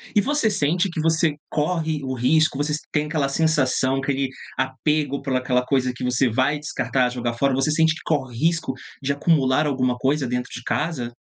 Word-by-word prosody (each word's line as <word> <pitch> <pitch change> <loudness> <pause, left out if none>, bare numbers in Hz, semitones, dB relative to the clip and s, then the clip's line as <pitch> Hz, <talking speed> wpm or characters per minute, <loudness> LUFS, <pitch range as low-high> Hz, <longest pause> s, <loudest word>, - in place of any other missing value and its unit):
E 205 - +6
você 285 -3 +1
sente 175 +2 +1
que 170 - -5
você 160 -1 +2
corre 155 -1 -1
o 130 - -3
risco, 135 +4 +2
você 150 +1 -1 0.2
tem 150 0 +1
aquela 150 -3 -1
sensação, 135 -3 +1
aquele 135 0 -1 0.3
apego 140 +2 0
por 135 -2 -2
aquela 125 0 +1
coisa 130 -2 +1
que - - -7
você 125 +1 +2
vai 130 +6 +1
descartar 135 -3 0
e 125 - -4
jogar 120 -1 -2
fora? 135 +3 +1
Você 135 +3 +1
sente 160 +1 +3
que 160 - -10
corre 130 -6 -1
risco 160 -2 0 0.3
de 140 +1 0
acumular 145 -1 +2
alguma 130 -3 0
coisa 135 +1 0
dentro 125 0 -2
de 120 - -7
casa? 125 -7 -2
140 Hz, 190 wpm, -23 LUFS, 130-155 Hz, 0.3 s, E